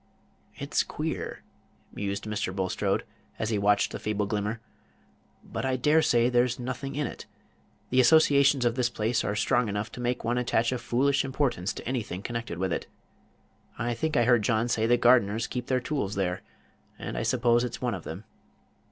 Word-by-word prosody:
"It's - - 0
queer!" - - -4 0.5
mused 100 0 -3
Mr. 105 -3 -2
Bulstrode, 95 -1 0 0.3
as 110 +1 -2
he 105 - +1
watched 100 0 +3
the - - -5
feeble 105 -1 -1
glimmer; 105 +2 -2 0.8
"but - - -5
I 130 -1 +1
dare 150 +5 +3
say 120 -5 +3
there's 125 0 +2
nothing 130 +2 -4
in 150 0 0
it. - - -7 0.6
The 130 - +3
associations 140 -1 +5
of 120 - +3
this 125 -1 +1
place 115 +1 0
are 105 - -1
strong 120 +2 +1
enough 105 +1 -3
to 125 - -8
make 125 +1 -1
one 120 +2 0
attach 120 -1 +1
a 125 - -2
foolish 135 +4 +1
importance 130 -8 -1
to - - -8
anything 105 -7 -3
connected 115 -7 -4
with 95 0 -1
it. - - -3 0.9
I 120 +1 -1
think 155 +6 -1
I 120 - +5
heard 120 -2 +4
John 110 +3 +1
say 110 -1 +1
the 120 +1 +4
gardeners 120 -2 +4
keep 125 0 -5
their 130 -1 +2
tools 125 -6 -2
there, 95 -2 -1 0.6
and - - -6
I - - -1
suppose 120 - +2
it's 120 -1 -4
one 125 -2 -1
of 90 -4 -6
them. 85 +6 -7
120 Hz, 185 wpm, -27 LUFS, 105-125 Hz, 0.9 s, associations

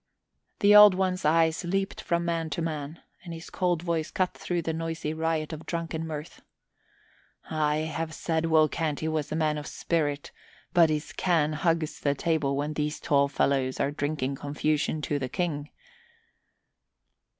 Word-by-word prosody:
The 205 +1 +6
Old 210 -2 +10
One's 185 -2 -1
eyes 160 +2 +3
leaped 195 +2 -2
from 170 0 0
man 165 -1 -1
to - - -1
man 155 -1 -5 0.2
and 170 -2 -7
his 165 +2 -10
cold 175 -3 0
voice 170 -2 -1
cut 185 -1 0
through 175 -1 -3
the 160 - -2
noisy 165 -1 -3
riot 160 0 -1
of 155 - -8
drunken 165 -1 -3
mirth. 155 +1 -7 1.1
"I 155 -1 +1 0.2
had 160 0 -2
said 165 -1 -1
Will 160 -1 +5
Canty 155 0 -2
was 155 -2 -2
a - - -1
man 155 -1 +1
of 150 - -8
spirit, 145 -4 -2 0.4
but 170 -2 +6
his 150 0 -2
can 160 -4 +1
hugs 165 -1 0
the 140 -1 +1
table 145 -3 0
when 150 +2 -2
these 150 0 -2
tall 140 -1 +3
fellows 135 -2 0
are 140 - +1
drinking 145 -2 -2
confusion 150 +1 -1
to 145 -1 -1
the 130 -2 -3
King." 150 -2 -2
160 Hz, 160 wpm, -27 LUFS, 150-170 Hz, 1.1 s, Old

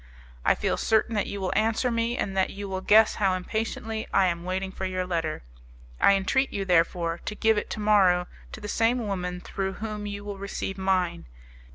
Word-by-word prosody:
"I - - +4
feel - - -1
certain 225 +1 +2
that 205 -2 0
you 200 - -5
will 185 -1 -1
answer 225 +3 +1
me, 230 +1 0
and 195 - -2
that 190 -1 +2
you 200 0 -6
will 190 -1 -3
guess 215 +3 +5
how 190 -2 +3
impatiently 220 +3 -3
I 195 - +4
am 170 -1 -1
waiting 190 +1 -2
for 190 - -5
your 185 0 -2
letter. 165 - -2 0.6
I - - +6
entreat 265 +8 +1
you, 195 -1 -3
therefore, 170 -1 +1
to 210 - -4
give 220 +1 +3
it 210 - -2
to - - -4
morrow 195 -4 +4 0.3
to - - -7
the 210 - -7
same 230 +2 +1
woman 180 -3 -3
through 190 +1 -3
whom 210 0 -5
you 205 0 -5
will 200 -1 -6
receive 195 0 -4
mine! 185 - 0
195 Hz, 205 wpm, -26 LUFS, 185-215 Hz, 0.6 s, I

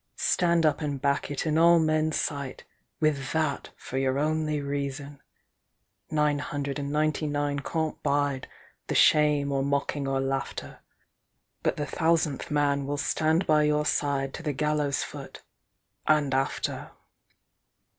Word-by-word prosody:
Stand 170 -2 +2
up 150 -1 +2
and 145 -2 -2
back 140 +1 0
it 145 +1 -3
in 155 0 +2
all 170 +1 +7
men's 155 -1 +1
sight—With 140 0 -3
that 155 -3 -1
for 130 - -4
your 135 0 +1
only 155 0 0
reason! 140 0 -4 0.9
Nine 150 -1 +1
hundred 140 0 -3
and 140 0 -3
ninety 155 +1 0
nine 145 -1 -1
can't 160 +2 -3
bideThe 140 -2 -3
shame 150 -2 +4
or 135 -1 +1
mocking 140 0 -1
or 135 0 0
laughter, 135 0 -3 0.8
But - - 0
the 145 - -2
Thousandth 160 -3 0
Man 145 -2 +1
will 145 +1 -2
stand 160 +4 +1
by 155 -1 +4
your 150 0 +2
sideTo 140 0 -1
the 150 -2 -1
gallows 150 -1 0
foot—and 150 -3 -4
after! 135 +1 -1
145 Hz, 130 wpm, -27 LUFS, 140-155 Hz, 0.9 s, all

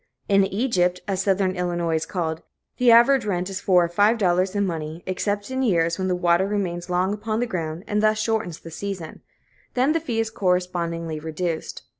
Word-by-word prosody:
In 195 -1 +4
"Egypt," 190 -4 +1
as 195 -2 0
Southern 190 -1 +1
Illinois 175 -2 -1
is 160 +1 -4
called, 165 -4 -3 0.4
the 250 -1 +4
average 240 +3 +6
rent 185 -2 -2
is 190 +1 -4
four 180 -2 +4
or - - +1
five 205 +7 +3
dollars 185 -1 +1
in 200 0 +1
money, 160 -1 -5
except 205 +4 -2
in 260 0 -1
years 170 -7 +1
when 185 - -1
the 180 - +1
water 175 +1 +2
remains 180 -4 -3
long 180 +2 +1
upon 215 +1 -2
the 245 - +1
ground, 165 -6 -4
and 210 0 0
thus 215 0 +3
shortens 215 -6 -2
the 165 - -10
season; 185 -2 -6 0.5
then 255 +4 +3
the 325 - +2
fee 245 -8 -3
is 225 0 -1
correspondingly 175 -4 -1
reduced. 160 +1 -4
185 Hz, 195 wpm, -23 LUFS, 175-210 Hz, 0.5 s, average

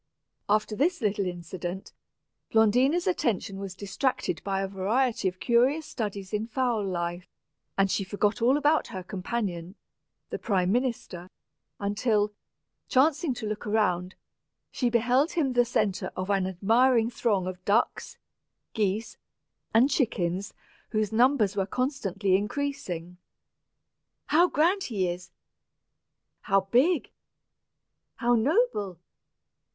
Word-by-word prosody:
After 215 +1 +1
this 330 - +1
little 205 -4 0
incident, 175 +1 -6 0.6
Blondina's 250 - +3
attention 215 - -1
was 195 -2 -6
distracted 200 - -2
by 195 0 -1
a - - -1
variety 205 +4 0
of 185 0 -3
curious 260 +6 +2
studies 205 -6 -5
in 210 +1 -1
fowl 240 -3 0
life, 175 -1 -3 0.5
and 195 -1 +3
she 195 - 0
forgot 205 +4 -1
all 255 +5 +4
about 295 +2 +2
her 185 -1 -6
companion, 185 -2 -4 0.6
the - - -3
prime 185 -4 +1
minister, 225 -7 -2 0.5
until, 210 +1 0 0.6
chancing 280 +1 +2
to 235 - -6
look 215 +2 -4
around, 185 -4 0 0.6
she 245 - 0
beheld 245 +6 +2
him 285 -6 +1
the 245 0 +4
centre 215 -5 -1
of 185 +2 -2
an 195 -2 +1
admiring 230 +5 +3
throng 210 -6 0
of 185 0 -6
ducks, 210 +5 0 0.6
geese, 215 0 -1 0.5
and 245 +6 +4
chickens, 195 - -1 0.3
whose 215 -1 0
numbers 230 -4 +3
were 195 -2 0
constantly 205 -7 0
increasing. 195 -6 -3 1.1
"How 340 +4 +4
grand 360 +5 +2
he 195 -6 -1
is!" 175 0 -5 1.1
"How 195 -1 +2
big!" 255 - +2 1.0
"How 240 +1 +1
noble!" 235 - +1
210 Hz, 120 wpm, -27 LUFS, 190-250 Hz, 1.1 s, all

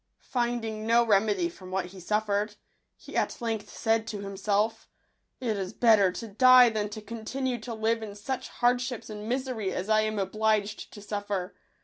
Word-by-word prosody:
Finding 235 -3 -1
no 235 +1 +5
remedy 215 - +3
from 190 - -11
what 185 -1 -1
he 190 - -10
suffered, 210 +2 0 0.4
he - - -12
at - - 0
length 225 -3 -3
said 225 -1 0
to 205 -2 -4
himself, 200 +2 -1 0.5
"It 230 -4 -1
is 190 +1 -4
better 215 -6 +5
to 225 +5 -6
die 250 +3 +7
than 215 -2 -2
to 215 +1 -8
continue 240 +3 -3
tp 225 0 -7
live 225 +1 +1
in 210 -2 -7
such 255 +6 -4
hardships 245 -2 0
and 210 +1 -6
misery 250 -6 -2
as 190 +3 -4
I 215 0 +5
am 215 0 -1
obliged 215 +1 0
to 205 - -10
suffer. 205 -2 -3
215 Hz, 170 wpm, -28 LUFS, 205-235 Hz, 0.5 s, die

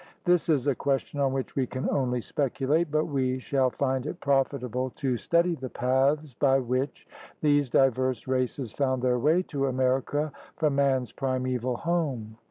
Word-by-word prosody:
This 175 -2 +2
is 145 -5 +2
a 140 - +3
question 140 +2 -2
on 135 -1 +2
which 135 -1 -3
we 130 -2 0
can 130 +2 -3
only 125 -3 0
speculate. 145 +5 0
But 155 +1 +1
we 130 -4 0
shall 130 0 +1
find 130 +1 -1
it 175 - -5
profitable 130 -2 0
to 135 -4 -1
study 170 +7 +2
the 130 -5 -6
paths 135 +4 +1
by 135 +2 +3
which 130 +2 -2 0.3
these 145 -3 +3
diverse 130 -2 +2
races 130 -2 -1
found 130 -1 -1
their 125 -1 +2
way 160 +8 +3
to 140 -5 -2
America 130 +3 0 0.2
from 155 -3 +1
man's 135 -3 +1
primeval 130 -2 -1
home. 135 -11 -2
135 Hz, 165 wpm, -27 LUFS, 130-145 Hz, 0.3 s, a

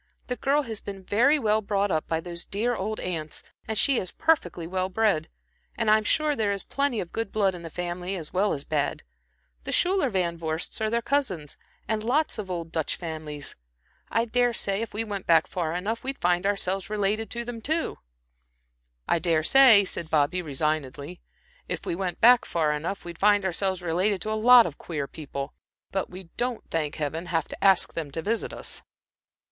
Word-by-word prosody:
The 250 - -3
girl 285 +3 +1
has 225 -5 -6
been 195 -2 -7
very 245 +11 +4
well 215 -5 +2
brought 200 -1 0
up 155 -2 0
by 160 - 0
those 170 0 -7
dear 235 +5 -1
old 215 +2 -3
aunts, 160 -4 -4 0.2
and 220 - -2
she 270 +3 +4
is 185 - -4
perfectly 180 - 0
well 185 +2 -2
bred. 195 -6 +1 0.5
And 225 -2 +2
I'm 215 0 +5
sure 300 +6 +2
there 215 -4 +1
is 200 -1 -2
plenty 280 -5 0
of 175 - -5
good 225 -3 -3
blood 200 -3 +2
in 175 - -8
the 165 - -7
family 175 +2 -4
as 160 -5 -6
well 200 +3 +2
as 140 - -5
bad. 145 -2 -1 0.6
The - - -3
Schuyler 370 -6 +2
Van 175 -5 -1
Vorsts 160 +5 -3
are 220 - +1
their 235 +1 0
cousins, 195 - -1 0.3
and 220 -1 -1
lots 270 +2 +1
of 200 -3 -5
old 170 -2 -4
Dutch 160 -3 -1
families. 155 -4 -5 0.5
I 230 +1 +1
dare 245 +1 +2
say, 200 -2 0
if 230 - -4
we 215 +2 -1
went 200 -3 -5 0.2
far 165 -3 -3
enough 210 +6 -2
back, - - -26
we'd 270 +1 -4
find 175 +2 +1
ourselves 195 -1 -1
related 215 +1 0
to 235 0 -4
them, 235 -1 -6
too." 320 +7 -1 1.1
"I - - +2
dare 165 -1 +1
say," 235 -2 +8
said 170 -3 -4
Bobby, 160 +4 +2
resignedly, 150 +1 -3 0.5
"if - - -4
we - - -1
went 180 -1 -2 0.3
far 155 -3 +1
enough 160 +6 -3
back, - - -20
we'd 170 -1 -8
find 205 -1 +4
ourselves 190 0 0
related 185 +4 +1
to 215 - -3
a - - +1
lot 235 +2 +7
of 150 - -6
queer 150 -5 -4
people. 140 -2 -6 0.4
But 195 - -2
we 180 -1 -10
don't, 245 -1 -2
thank 155 -3 -1
Heaven! 155 +3 -3
have 165 -3 0
to - - -7
ask 195 -2 +5
them 160 -3 -4
to 160 +3 -4
visit 225 +2 -1
us." - - -4
190 Hz, 200 wpm, -26 LUFS, 165-220 Hz, 1.1 s, say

